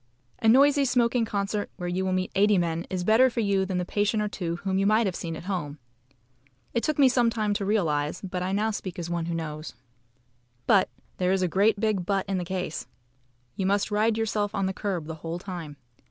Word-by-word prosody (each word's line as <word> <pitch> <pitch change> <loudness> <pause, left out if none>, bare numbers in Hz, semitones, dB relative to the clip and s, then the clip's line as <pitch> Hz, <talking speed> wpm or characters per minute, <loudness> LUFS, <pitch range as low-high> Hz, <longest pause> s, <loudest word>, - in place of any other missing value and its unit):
A 225 - 0
noisy 280 +4 +6
smoking 245 -2 +2
concert 205 -1 -2
where 180 -2 -4
you 180 +2 -1
will 190 - 0
meet 185 0 -1
eighty 205 +1 +4
men 170 -1 -1
is 185 -1 -2
better 225 +7 +5
for 240 - -4
you 195 -2 +1
than 185 -1 -2
the 180 - -1
patient 210 +3 0
or - - 0
two 175 -4 -3
whom 190 -1 0
you 195 - +2
might 215 +2 +4
have 190 -3 -1
seen 165 -1 -4
at - - -8
home. 175 -6 -3 1.0
It 235 - +1
took 305 +3 -1
me 280 -2 +6
some 245 -2 +3
time 215 -2 0
to 200 -1 -2
realise, 160 -7 0
but 185 -2 -4
I 180 - -1 0.2
speak 190 -4 -5
now - - -5
as 170 -1 -4
one 170 -1 -2
who 170 - -2
knows. 155 -3 -5 0.9
But 195 -3 +4 0.3
there 180 0 +1
is 190 -1 +1
a - - +2
great 200 +5 +2
big 215 -4 +1
"but" 195 +1 0
in 195 -2 -1
the - - -2
case. 180 -9 -4 0.7
You 190 - -1
must 200 +2 +1
ride 215 +2 +2
yourself 210 -2 -1
on 195 - 0
the 190 - -1
curb 190 -5 -3
the 160 - -5
whole 165 +1 -4
time. 175 -6 -7
195 Hz, 225 wpm, -26 LUFS, 175-215 Hz, 1.0 s, noisy